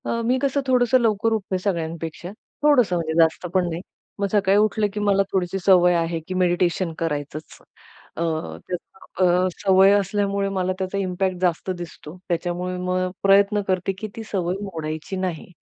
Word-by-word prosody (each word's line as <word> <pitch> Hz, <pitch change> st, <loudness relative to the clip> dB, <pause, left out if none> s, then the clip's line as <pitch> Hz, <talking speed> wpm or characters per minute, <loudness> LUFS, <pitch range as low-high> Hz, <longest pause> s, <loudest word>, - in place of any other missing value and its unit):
अ, 230 Hz, -, -1 dB
मी 250 Hz, +2 st, +2 dB
कसं 280 Hz, +1 st, 0 dB
थोडंसं 255 Hz, 0 st, +4 dB
लवकर 225 Hz, -1 st, +1 dB
उठते 195 Hz, -3 st, -2 dB
सगळ्यांपेक्षा. 165 Hz, -2 st, -3 dB, 0.3 s
थोडंसं 250 Hz, -11 st, +4 dB
म्हणजे 165 Hz, -2 st, -2 dB
जास्त 165 Hz, +2 st, +2 dB
पण 185 Hz, -2 st, +2 dB
नाही. 165 Hz, +1 st, -4 dB, 0.4 s
मग 200 Hz, -, +1 dB
सकाळी 200 Hz, -1 st, +3 dB
उठलं 215 Hz, 0 st, +2 dB
की 210 Hz, -, -3 dB
मला 200 Hz, -1 st, +3 dB
थोडीशी 190 Hz, 0 st, -1 dB
सवय 180 Hz, -2 st, +6 dB
आहे 165 Hz, 0 st, 0 dB
की 185 Hz, -, -4 dB
मेडिटेशन 175 Hz, -1 st, +1 dB
करायचंच. 150 Hz, -1 st, -4 dB, 0.6 s
अ, 170 Hz, -, -2 dB, 0.4 s
त्या 180 Hz, 0 st, -1 dB, 0.2 s
सवय 190 Hz, 0 st, +6 dB
असल्यामुळे 200 Hz, 0 st, -1 dB
मला 185 Hz, -1 st, -1 dB
त्याचा 190 Hz, +1 st, -2 dB
इम्पॅक्ट 185 Hz, -1 st, -1 dB
जास्त 180 Hz, 0 st, 0 dB
दिसतो. 170 Hz, -1 st, -9 dB
त्याच्यामुळे 175 Hz, +1 st, -2 dB
मग 185 Hz, 0 st, 0 dB
प्रयत्न 200 Hz, +1 st, +4 dB
करते 185 Hz, 0 st, 0 dB
की 215 Hz, -, -5 dB
ती 225 Hz, -, -6 dB
सवय 180 Hz, -2 st, -1 dB
मोडायची 160 Hz, -2 st, -5 dB
नाही. 185 Hz, -2 st, -4 dB
185 Hz, 155 wpm, -23 LUFS, 175-200 Hz, 0.6 s, सवय